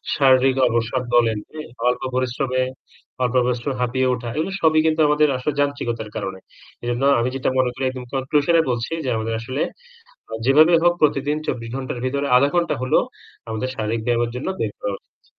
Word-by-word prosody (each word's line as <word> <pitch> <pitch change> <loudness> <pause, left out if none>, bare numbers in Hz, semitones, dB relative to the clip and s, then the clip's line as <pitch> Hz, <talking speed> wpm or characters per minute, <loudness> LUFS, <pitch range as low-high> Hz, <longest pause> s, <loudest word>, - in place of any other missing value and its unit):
শারীরিক 135 -1 +4
অবসাদ 120 +2 -1
বলেন, 115 -2 +3
হ্যাঁ? 155 -3 -8 0.2
অল্প 125 - -1
পরিশ্রমে 130 0 0 0.6
অল্প 125 +1 0
পরিশ্রমে 125 +2 -1
হাঁপিয়ে 130 +1 +1
ওঠা 120 -1 -4
এগুলো 160 +5 -1
সবই 155 -1 +4
কিন্তু 160 0 +2
আমাদের 150 0 +4
আসল 140 +4 -2
যান্ত্রিকতার 120 -6 -1
কারণে। 95 -1 -4 0.4
এজন্য 120 +2 -2 0.2
আমি 120 +2 +1
যেটা 135 - 0
মনে 130 -1 +3
করি 130 +2 -6
একদম 130 -1 -5
কনক্লুশন 145 +5 +1
এ - - +6
বলছি 120 +5 -3
যে 130 - 0
আমাদের 110 +1 -2
আসলে 130 +6 -4 0.9
যেভাবে 155 +5 +6
হোক 175 0 +5
প্রতিদিন 145 0 +2
২৪ 115 -1 -3
ঘণ্টার 130 -2 -4
ভেতরে 140 +2 -1
০.৫ 140 +3 +4
ঘণ্টা 170 -1 +1
হলেও 130 - +3 0.5
আমাদের 110 +3 -3
শারীরিক 110 +1 -2
ব্যায়ামের 120 -1 +1
জন্য 125 - -4
বের 105 -2 -1
করা 100 - -2
উচিত। - - -49
130 Hz, 175 wpm, -21 LUFS, 120-140 Hz, 0.9 s, এ